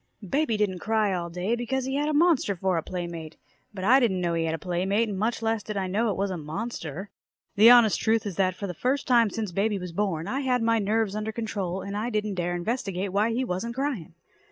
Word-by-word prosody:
_ 195 - -10
Baby 275 -7 +1
didn't 195 -4 0
cry 215 -1 +1
all 170 -1 -3
day, 180 +7 -1
because 245 +2 -2
he 265 - -3
had 295 +2 0
a - - 0
monster 305 - +3
for 185 0 0
a 165 - +1
playmate. 170 -3 -6 0.3
But 190 -3 -7
I 250 +7 +6
didn't 210 -8 +1
know 175 -1 0
he 165 -1 0
had 160 0 -1
a - - -5
playmate, 190 +7 0
and 205 - -4
much 225 +2 -1
less 225 -1 0
did 210 0 -5
I 195 - 0
know 210 +5 0
it 200 - -2
was 195 0 -1
a 185 - -3
monster. 165 +2 -5 0.4
The 215 +3 +8
honest 240 -4 +6
truth 220 0 +1
is 200 -4 -4
that 185 -2 +2
for 200 - -5
the 180 - -4
first 255 - -1
time 235 -4 +5
since 215 -1 -4
baby 205 +3 0
was 180 -2 -6
born, 175 -3 -1
I 260 +6 -1
had 250 -3 +1
my 230 0 +3
nerves 210 0 0
under 215 +1 -2
control, 200 -5 -3
and 200 0 -5
I 215 +3 -2
didn't 210 -2 -1
dare 175 -1 -2
investigate 195 -1 -2
why 210 +3 +2
he 245 +3 -1
wasn't 230 +4 -3
crying. 260 - -3
205 Hz, 250 wpm, -26 LUFS, 180-230 Hz, 0.4 s, The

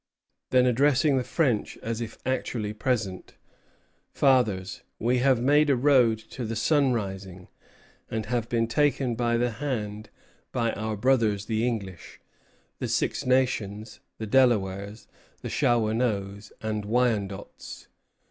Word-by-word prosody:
Then 125 -1 +4
addressing 135 +3 +3
the 130 - 0
French 125 -3 0
as 115 0 -3
if 115 -1 -6
actually 120 -4 -2
present: 105 -5 -2 0.8
"Fathers, 110 -9 +2 0.2
we 125 +2 +1
have 130 -1 +3
made 145 +4 +3
a 140 - +4
road 125 -4 +4
to 125 - -5
the 115 0 -3
sun 140 +4 +2
rising, 95 -5 -5 0.6
and 110 -1 -3
have 115 0 -2
been 115 -1 +1
taken 135 +1 +1
by 120 0 0
the 120 0 0
hand 110 -4 -4 0.4
by 115 -2 0
our 110 0 -3
brothers 110 -4 +2
the 110 0 -1
English, 100 -7 -5 0.6
the - - -2
Six - - -1
Nations, 115 -5 0 0.2
the 110 - -5
Delawares, 105 -4 +1 0.4
Shawanoes, 110 -3 0
and 110 -1 -2
Wyandots. 105 -3 -2
115 Hz, 125 wpm, -26 LUFS, 105-125 Hz, 0.8 s, Then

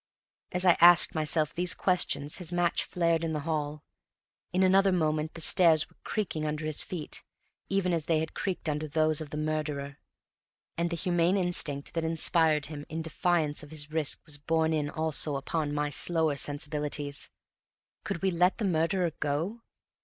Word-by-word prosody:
As 180 0 +2
I 180 - +5
asked 175 0 +7
myself 155 -1 +2
these 180 +1 0
questions 165 -5 0
his 180 -2 -4
match 175 -1 0
flared 170 -2 0
in 160 -1 -2
the 150 - -3
hall; 150 -1 -4 0.7
in 185 +1 +1
another 195 +1 +4
moment 155 -3 -1
the 165 - -6
stairs 160 -2 +5
were - - -28
creaking 185 -8 -3
under 155 0 -3
his 155 -1 -1
feet, 170 -5 -5 0.5
even 195 -2 0
as 165 -2 -2
they 165 - +1
had 160 0 -3
creaked 185 -4 -4
under 150 0 -2
those 155 0 +1
of 155 - -7
the 150 - -6
murderer; 150 -2 -4 0.8
and 170 +1 -1
the 170 - -3
humane 175 +2 +1
instinct 170 -6 +2
that 165 -1 -2
inspired 160 -2 +3
him 145 -1 -8
in 160 +1 -5
defiance 160 -2 -1
of 150 - -12
his 150 -1 -5
risk 155 -2 -2
was 150 -2 -2
borne 160 +1 0
in 150 -2 -1
also 155 -2 0
upon 145 +2 -3
my 145 0 -2
slower 160 0 +4
sensibilities. 145 0 -2 0.7
Could 170 - -5
we 190 - +2
let 180 +2 +1
the 215 - -2
murderer 170 0 0
go? 165 +11 -3
160 Hz, 175 wpm, -28 LUFS, 150-175 Hz, 0.8 s, asked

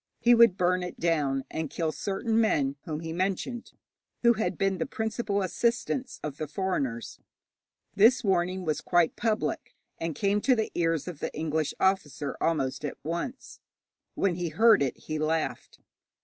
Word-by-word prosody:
He 240 - +5
would 230 -5 +6
burn 180 +1 +2
it 180 - -6
down, 145 -5 +1
and 160 -2 -3
kill 160 +1 -1
certain 220 +6 0
men 140 -10 +1
whom 155 -1 -4
he 165 -1 -5
mentioned, 195 +7 -2 0.5
who 235 0 +6
had 220 0 -2
been 195 -1 0
the 245 - -1
principal 220 -4 -2
assistants 235 +5 -1
of 150 -2 -5
the 155 - -4
foreigners. 145 - -3 0.7
This 230 +5 +5
warning 185 -1 +1
was 155 -2 -1
quite 175 -2 +2
public, 220 -1 -2 0.2
and 165 -2 -3
came 200 +5 +1
to 260 +2 +4
the 220 -2 -1
ears 165 -2 0
of 170 -5 -6
the - - -3
English 155 -1 -1
officer 155 -7 0
almost 135 -5 0
at 145 - -4
once. 170 - -5 0.6
When 195 -3 +1
he 175 -1 -3
heard 220 +5 +5
it 135 -3 0
he 155 0 -5
laughed. 155 +1 -2
180 Hz, 165 wpm, -28 LUFS, 155-215 Hz, 0.7 s, would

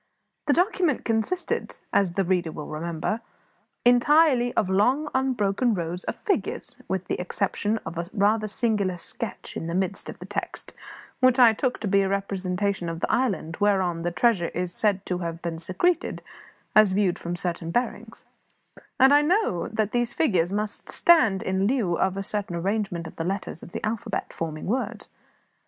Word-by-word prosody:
The 290 - +5
document 355 - +1
consisted, 235 +11 -1 0.2
as 190 -4 +3
the 195 - +1
reader 175 -2 0
will 150 - -7
remember, 170 +7 -3 0.6
entirely 245 0 +5
of 205 - +2
long, 245 +11 +2
unbroken 240 -3 +1
rows 175 0 -4
of - - -2
figures 405 - -2
with 190 -1 -2
the - - -2
exception 205 +3 -1
of 170 - -5
a 170 - -3
rather 215 +2 +2
singular 205 -4 0
sketch - - -7
in 165 - -4
the 170 - -3
midst 190 +1 -2
of - - -8
the - - -9
text, - - -5 0.5
which 255 -1 +4
I 240 -3 +7
took 250 +3 -1
to 215 - -2
be 195 0 +4
a 195 - 0
representation 195 -1 -1
of 165 0 -5
the - - 0
island 190 -10 0
whereon 190 -5 +2
the 175 - 0
treasure 180 -1 +2
was 180 0 -2
said 200 -2 +1
to 180 -1 -2
have 170 -1 -4
been 165 -1 -3
secreted, 325 - 0 0.5
as 215 -3 +6
viewed 195 -3 +1
from 170 +1 -4
certain 175 -2 -3
bearings 240 +9 -3 0.7
and 265 +2 +7
I 290 - +7
knew 305 - +1
that 215 -1 0
these 240 -1 0
figures 185 - +2
must 210 +1 -3
stand 240 - +4
in 190 +1 +1
lieu 225 -8 +1
of 190 +2 0
a 195 - -2
certain 200 -3 -2
arrangement 185 -1 -2
of - - -10
the 165 - -2
letters 190 -2 -3
of - - -11
the - - -4
alphabet, 215 0 -3
forming 155 -2 -4
words. 230 -1 -2
200 Hz, 175 wpm, -25 LUFS, 175-240 Hz, 0.7 s, I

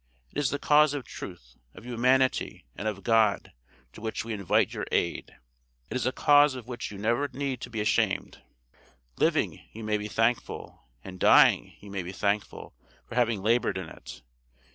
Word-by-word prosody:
It - - -3
is 145 - +1
the 145 - -2
cause 150 0 +4
of 135 -5 -5
truth, 60 -10 -10 0.2
of - - -12
humanity, 125 - +1
and 110 - -4
of 100 -2 -4
God, 110 -3 +2 0.4
to - - -12
which 110 0 -3
we 115 - -4
invite 100 -3 +1
your - - -4
aid. 85 - -1 0.6
It - - -3
is 130 -1 0
a - - +2
cause 145 0 +5
of 125 -2 -9
which 120 -2 -5
you 100 - -9
never 115 +7 0
need 135 -2 -4
be 110 -2 -2
ashamed. 105 - 0 0.8
Living, - - +1
you 110 - -8
may 105 0 0
be 105 - -4
thankful, 115 - -2 0.2
and 95 -1 -9
dying, - - +5
you 100 0 -11
may 100 -1 -3
be 90 +1 -7
thankful, 100 +1 -2 0.3
for - - -10
having 115 -5 +1
labored 115 -1 +2
in 95 -4 -6
it. - - -12
115 Hz, 180 wpm, -28 LUFS, 100-130 Hz, 0.8 s, cause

